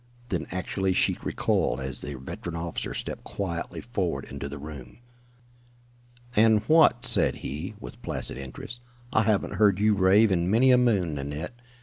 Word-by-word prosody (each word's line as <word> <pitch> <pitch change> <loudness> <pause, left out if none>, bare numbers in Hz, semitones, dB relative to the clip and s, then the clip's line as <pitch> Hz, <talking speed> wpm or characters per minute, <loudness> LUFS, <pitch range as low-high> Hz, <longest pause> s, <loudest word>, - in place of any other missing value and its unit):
Then 90 -4 -2
actually 95 +1 -1
she - - +2
recoiled 65 - 0
as 65 -1 -1
the 75 - -5
veteran 65 +6 -7
officer 85 0 -4
stepped - - -5
quietly 85 -4 -4
forward 90 - -2
into 70 0 -6
the 75 - -7
room. 70 -4 -10 1.4
"And 110 -1 +5
what?" 155 -6 +5
said - - +5
he, 80 +10 -5
with - - -10
placid - - -3
interest. 70 - -8 0.3
"I - - +4
haven't 105 -2 0
heard 100 -3 +4
you 105 +1 +3
rave 100 +2 +4
in 85 -1 +1
many 120 +5 +5
a 125 - +6
moon, 100 -10 +2
Nanette. 75 - -5
90 Hz, 155 wpm, -26 LUFS, 75-105 Hz, 1.4 s, a